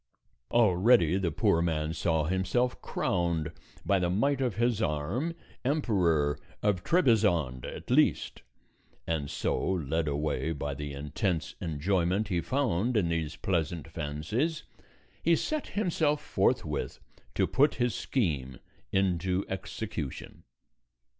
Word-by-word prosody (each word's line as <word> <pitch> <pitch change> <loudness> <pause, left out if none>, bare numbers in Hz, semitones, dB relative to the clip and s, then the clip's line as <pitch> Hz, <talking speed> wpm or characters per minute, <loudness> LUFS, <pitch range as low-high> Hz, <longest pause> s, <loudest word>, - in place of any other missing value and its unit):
Already 95 -4 +4
the 90 -3 0
poor 80 +2 +2
man 80 -2 0
saw 80 -2 +1
himself 95 +9 0
crowned, 85 -3 -1 0.3
by 100 -1 +3
the 90 -1 +1
might 135 +9 +1
of 125 -6 0
his 120 -1 +1
arm, 95 - -1 0.3
Emperor 90 - +1 0.2
of 100 -4 +1
Trebizond 100 - +2
at - - -7
least; - - +2 0.6
and 75 -4 -2
so, - - -1
led 80 -3 0
away 75 +2 -1
by 70 -1 -3
the 75 +1 -5
intense 75 +4 -2
enjoyment 90 +5 0
he 90 -3 +1
found 125 - 0
in 90 -5 +2
these 80 -2 -2
pleasant 85 -3 -1
fancies, 80 - -2 0.6
he 170 +1 +4
set 310 - -2
himself 160 -7 +1
forthwith - - 0 0.4
to - - +3
put 145 +3 +3
his 120 -2 +1
scheme 70 - -1 0.3
into 95 0 +1
execution. 95 -6 -5
90 Hz, 120 wpm, -29 LUFS, 80-115 Hz, 0.6 s, Already